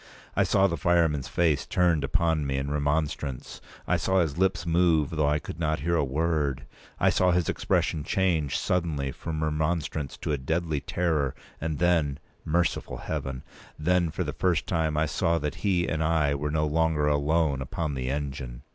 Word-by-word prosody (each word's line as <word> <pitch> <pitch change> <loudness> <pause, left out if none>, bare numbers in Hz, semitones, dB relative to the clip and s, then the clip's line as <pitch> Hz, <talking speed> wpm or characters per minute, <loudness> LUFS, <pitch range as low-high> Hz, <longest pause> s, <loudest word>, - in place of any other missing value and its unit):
I - - +3
saw 95 -1 +3
the 85 -3 +1
fireman's 80 -3 +2
face 80 -5 +1
turned 85 -5 +2
upon 80 0 +1
me 70 0 -1
in 70 +1 -2
remonstrance; 75 -2 -2 0.3
I - - +2
saw 95 0 +1
his 80 -5 0
lips 95 -1 +1
move, 85 -3 +3
though 75 -2 +1
I 75 - +2
could 75 +1 -8
not 80 -3 0
hear 85 +3 +1
a 80 - +2
word; 70 -2 -1 0.3
I - - +4
saw 90 - +3
his 90 -2 +2
expression 75 -3 0
change 80 -5 +1
suddenly 80 -6 -1
from 80 +3 -4
remonstrance 75 -1 -1
to - - -1
a 75 - 0
deadly 80 +2 -1
terror, 80 -6 0 0.3
and 80 -1 -2
then—merciful 80 0 0
Heaven! 65 -1 -4 0.3
then, 85 +2 +2
for 90 +3 -2
the 75 -3 -4
first 85 +2 +1
time, 80 -3 0
I 75 - +3
saw 85 +2 +1
that 75 -2 -2
he 90 -4 +1
and 80 0 -1
I 80 -3 +2
were 75 +1 -2
no 75 +1 +1
longer 80 0 +1
alone 75 -1 +1
upon 75 +3 -3
the 65 -1 -3
engine. 70 -4 -4
80 Hz, 175 wpm, -27 LUFS, 70-85 Hz, 0.3 s, I